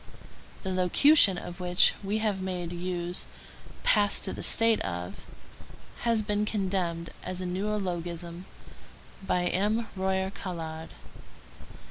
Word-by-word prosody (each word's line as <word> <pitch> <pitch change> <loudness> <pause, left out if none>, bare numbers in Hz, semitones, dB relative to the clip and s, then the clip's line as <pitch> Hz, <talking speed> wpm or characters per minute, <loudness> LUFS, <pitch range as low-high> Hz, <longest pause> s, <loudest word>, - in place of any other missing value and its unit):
The 190 - -2
locution 190 - +5
of 175 +1 -7
which 180 0 +4
we 200 +2 0
have 210 -3 -1
made 180 -2 -3
use—passed 180 +3 -1
to - - +1
the - - -6
state 225 -1 +4
of—has 90 - -5
been 210 0 0
condemned 185 -5 -1
as 185 0 -4
a 185 - -3
neologism 180 -3 -3 0.8
by 180 -2 0
M. 210 +5 0
Royer 190 0 0
Collard. 160 -4 -6
185 Hz, 105 wpm, -28 LUFS, 175-205 Hz, 0.8 s, locution